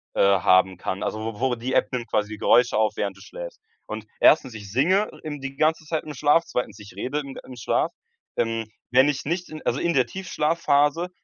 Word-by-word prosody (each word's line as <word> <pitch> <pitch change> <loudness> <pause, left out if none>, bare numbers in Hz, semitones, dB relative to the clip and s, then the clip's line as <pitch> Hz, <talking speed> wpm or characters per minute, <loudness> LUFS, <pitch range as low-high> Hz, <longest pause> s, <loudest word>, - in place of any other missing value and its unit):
äh, - - +2
haben 95 -1 +4
kann. 95 +2 -3
Also, 110 - -2
wo 110 -1 -5
wo 130 0 +1
die 120 +3 -4
App 105 - +2
nimmt 120 -2 -3
quasi 105 -1 0
die 110 - -6
Geräusche 120 +2 +4
auf, 110 -1 +2
während 100 -1 -2
du - - -16
schläfst. - - -9 0.2
Und 110 0 -7
1., 130 -6 +5
ich 100 -3 -9
singe 185 - +2
im 150 -3 -6
die 135 0 -6
ganze 155 0 +2
Zeit 155 0 -2
im 150 -1 -7
Schlaf, 150 +5 +4
2., 110 -4 -3
ich 105 0 -12
rede 145 +4 -2
im 140 -2 -7
im 130 - -10
Schlaf. 115 - 0 0.4
Ähm, 115 -1 -1 0.2
wenn 130 +2 +5
ich 140 -2 -2
nicht 175 +4 -2
in 155 - -8
also, 130 - 0
in 170 - +1
der 130 -4 +3
Tiefschlafphase, 165 -2 +1
130 Hz, 220 wpm, -24 LUFS, 110-155 Hz, 0.4 s, 1